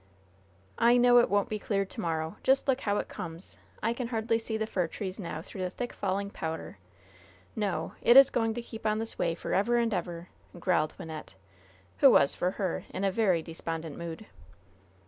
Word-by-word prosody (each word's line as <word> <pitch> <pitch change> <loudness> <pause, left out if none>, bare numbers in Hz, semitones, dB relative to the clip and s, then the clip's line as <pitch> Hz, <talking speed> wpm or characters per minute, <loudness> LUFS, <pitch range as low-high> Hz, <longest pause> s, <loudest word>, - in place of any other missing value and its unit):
"I 240 +1 +6
know 245 0 +7
it 240 - +3
won't 205 0 +2
be 215 - -3
clear 195 -1 0
to 220 +4 -7
morrow! 160 +1 -2
Just 270 +2 +3
look 265 0 +2
how 205 -4 0
it - - -2
comes. 165 +2 -8 0.2
I 230 +2 +2
can 235 0 -4
hardly 225 -1 0
see 225 -1 -3
the 220 - -1
fir 185 -5 -1
trees 190 +3 -5
now 165 -4 -5
through 190 - -8
the 180 - -1
thick 245 +6 -5
falling 200 +1 -2
powder. 160 - -5 0.8
No! 195 -7 -2
it 240 - +7
is 275 -1 +9
going 225 -2 0
to 240 - -4
keep 225 -2 -6
on 215 0 +1
this 225 +1 -4
way 170 -1 +1
forever 205 +7 +1
and 230 -2 +1
ever," 175 -2 -4 0.3
growled 165 -4 +1
Wynnette, 155 -9 -8 0.6
who - - +8
was, 140 - +5
for 180 - 0
her, 190 -4 -2
in 190 - -4
a 195 - +2
very 185 -6 +2
despondent 165 -1 -5
mood. 170 +4 -7
200 Hz, 195 wpm, -29 LUFS, 170-225 Hz, 0.8 s, is